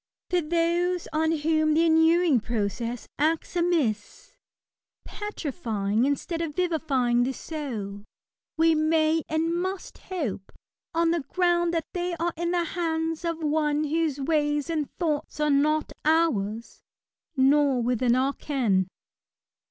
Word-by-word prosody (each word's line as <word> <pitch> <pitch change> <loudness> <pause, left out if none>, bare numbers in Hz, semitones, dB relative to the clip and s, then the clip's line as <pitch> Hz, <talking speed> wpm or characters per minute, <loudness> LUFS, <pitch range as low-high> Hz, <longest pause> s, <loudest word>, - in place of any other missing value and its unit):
For 360 -1 +3
those 340 +2 0
on 315 +1 +2
whom 310 0 +1
the 330 +1 +4
inuring 320 -2 +4
process 230 +1 -3
acts 320 +4 0
amiss, 330 - -1 0.4
— - - -67 0.3
petrifying 240 - -2
instead 325 +4 -2
of 310 -3 -4
vivifying 285 -9 +1
the 255 +2 0
soul, 220 -11 -6 0.5
we 325 0 +4
may 315 +1 +2
and 320 +1 0
must 375 +2 -4
hope, 270 - -5 0.4
on 335 0 +3
the 340 - +1
ground 345 +2 +1
that 330 - -1
they 355 -1 -2
are 340 +1 -1
in 340 +1 -2
the 350 -1 +1
hands 325 -1 -2
of 335 -1 -3
one 300 0 +1
whose 310 -1 0
ways 295 +1 0
and 305 -4 -1
thoughts 305 -3 -2
are 300 0 +2
not 305 +2 +2
ours, 235 -9 0 0.6
nor 270 -1 +4
within 245 0 +2
our 265 +2 +1
ken. 225 -13 0
310 Hz, 130 wpm, -26 LUFS, 265-335 Hz, 0.6 s, the